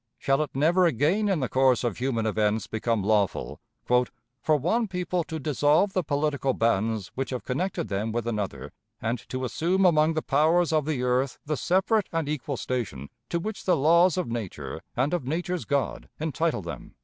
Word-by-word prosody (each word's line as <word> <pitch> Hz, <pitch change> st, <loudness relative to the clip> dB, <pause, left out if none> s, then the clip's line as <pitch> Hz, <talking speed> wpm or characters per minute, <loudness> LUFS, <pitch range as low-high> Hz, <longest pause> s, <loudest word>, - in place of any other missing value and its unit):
Shall 135 Hz, +2 st, +1 dB
it 150 Hz, -, -1 dB
never 170 Hz, +6 st, +4 dB
again 170 Hz, -, +1 dB
in 185 Hz, -7 st, +1 dB
the 130 Hz, -, 0 dB
course 130 Hz, -1 st, +3 dB
of 120 Hz, -4 st, -2 dB
human 120 Hz, -3 st, 0 dB
events 110 Hz, 0 st, +1 dB
become 110 Hz, -1 st, -1 dB
lawful 105 Hz, -2 st, 0 dB, 0.3 s
"for 125 Hz, +3 st, 0 dB
one 215 Hz, -, +1 dB
people 180 Hz, -2 st, -2 dB
to 160 Hz, -, -5 dB
dissolve 150 Hz, +7 st, +2 dB
the 185 Hz, -, +1 dB
political 145 Hz, -2 st, 0 dB
bands 110 Hz, -2 st, 0 dB
which 135 Hz, 0 st, -3 dB
have 125 Hz, -2 st, -4 dB
connected 175 Hz, +6 st, -2 dB
them 105 Hz, +3 st, -2 dB
with 120 Hz, 0 st, -2 dB
another, 105 Hz, -4 st, -3 dB, 0.3 s
and 115 Hz, +2 st, -2 dB
to 130 Hz, 0 st, -3 dB
assume 180 Hz, +8 st, +1 dB
among 155 Hz, -2 st, +4 dB
the 155 Hz, -, -1 dB
powers 160 Hz, +4 st, +3 dB
of 155 Hz, -2 st, +2 dB
the 145 Hz, -5 st, -1 dB
earth 125 Hz, +1 st, +1 dB
the 155 Hz, +1 st, -1 dB
separate 190 Hz, +6 st, +1 dB
and 165 Hz, -3 st, -1 dB
equal 145 Hz, -2 st, -3 dB
station 105 Hz, -, -4 dB, 0.2 s
to 170 Hz, -, 0 dB
which 215 Hz, +4 st, -5 dB
the 180 Hz, -3 st, +3 dB
laws 170 Hz, +5 st, +4 dB
of 180 Hz, -, -1 dB
nature 90 Hz, -, -5 dB, 0.2 s
and 135 Hz, +7 st, +1 dB
of 170 Hz, -8 st, -2 dB
nature's 175 Hz, +3 st, -2 dB
God 140 Hz, -2 st, -1 dB
entitle 160 Hz, -, -1 dB
them"? 85 Hz, -, -8 dB
140 Hz, 185 wpm, -26 LUFS, 120-170 Hz, 0.3 s, never